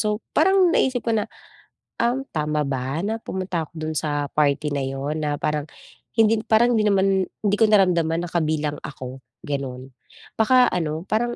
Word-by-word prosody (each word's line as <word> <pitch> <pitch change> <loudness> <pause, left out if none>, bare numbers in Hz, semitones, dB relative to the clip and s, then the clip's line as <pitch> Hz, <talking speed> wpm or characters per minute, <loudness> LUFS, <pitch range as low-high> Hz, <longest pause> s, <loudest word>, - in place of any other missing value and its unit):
So 210 0 0 0.2
parang 375 +3 +5
naisip 260 -5 +2
ko 230 - +2
na, 210 - 0 0.8
um, 245 +3 +1
tama 150 -1 -1
ba 135 +2 -2
na 220 +2 -1
pumunta 185 -3 -3
ako - - -37
dun 155 0 -4
sa 145 -2 -1
party 150 0 +1
na 140 - -1
yun 135 +3 -3
na 145 -1 0
parang 150 -1 -1 0.5
hindi 225 0 +4
parang 235 +2 +4
di 215 - +2
naman 195 -1 +2 0.2
di 205 0 +2
ko 220 - +6
naramdaman 175 -5 +3
na - - -8
kabilang 155 -3 -1
ako 130 -1 -8 0.2
ganon. 135 -3 -5 0.5
Baka 250 +3 +5
ano, 160 -2 -2
parang, 240 +3 0
165 Hz, 170 wpm, -23 LUFS, 150-215 Hz, 0.8 s, ko